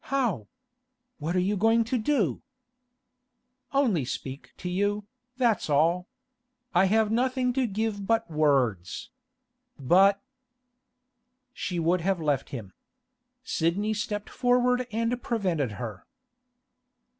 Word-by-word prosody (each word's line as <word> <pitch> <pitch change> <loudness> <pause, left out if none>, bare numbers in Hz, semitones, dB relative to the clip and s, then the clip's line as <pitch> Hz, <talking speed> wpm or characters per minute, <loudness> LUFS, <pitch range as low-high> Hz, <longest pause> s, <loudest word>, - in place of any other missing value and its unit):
'How? 240 - 0 0.7
What 160 +4 -2
are 180 0 +2
you 205 - +1
going 225 +3 +3
to 235 +2 -1
do?' 215 - +1 1.3
'Only 245 - +2
speak 130 +2 -6
to 180 - -6
you, 205 +3 0 0.3
that's 235 -9 +1
all. 165 +5 +2 0.7
I 175 +2 +5
have 215 +2 +2
nothing 250 +1 +1
to 255 -1 +1
give 205 -1 -2
but 225 +1 +2
words. 135 - 0 0.7
But—' 190 +8 +4 1.3
She 180 -7 -4
would 170 +2 +2
have 190 +1 0
left 145 -4 0
him. 110 -8 -7 0.7
Sidney 200 0 0
stepped 210 0 -4
forward 250 0 +2
and 230 +3 -1
prevented 180 - -1
her. 105 -1 -7
200 Hz, 110 wpm, -27 LUFS, 160-230 Hz, 1.3 s, I